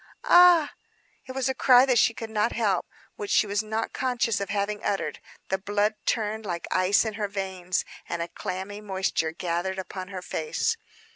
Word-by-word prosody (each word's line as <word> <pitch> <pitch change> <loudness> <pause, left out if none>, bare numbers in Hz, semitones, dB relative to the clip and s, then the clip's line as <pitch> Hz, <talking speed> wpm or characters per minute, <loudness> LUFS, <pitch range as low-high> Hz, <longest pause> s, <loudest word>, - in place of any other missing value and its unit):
"Ah!" 350 -4 +7 0.5
It 260 - -6
was 265 -1 -1
a 265 - +1
cry 255 -1 +6
that 250 -3 +3
she 230 - +3
could 225 -1 -6
not 215 +2 +1
help; 205 -6 0 0.3
which 205 - -5
she - - +4
was 205 +1 0
not 220 +1 -3
conscious 245 -5 0
of 200 - -3
having 205 +1 -2
uttered. 200 - -2 0.3
The 190 - 0
blood 205 +2 +1
turned 220 -1 0
like 175 -4 -4
ice 185 +4 +3
in 220 - -2
her 205 - +1
veins, 190 -2 -2 0.2
and 170 - -2
a 170 - -2
clammy 190 +4 -6
moisture 190 -5 -1
gathered 175 +3 -2
upon 185 0 -6
her 185 -2 -7
face. 155 -3 -1
205 Hz, 185 wpm, -26 LUFS, 190-225 Hz, 0.5 s, Ah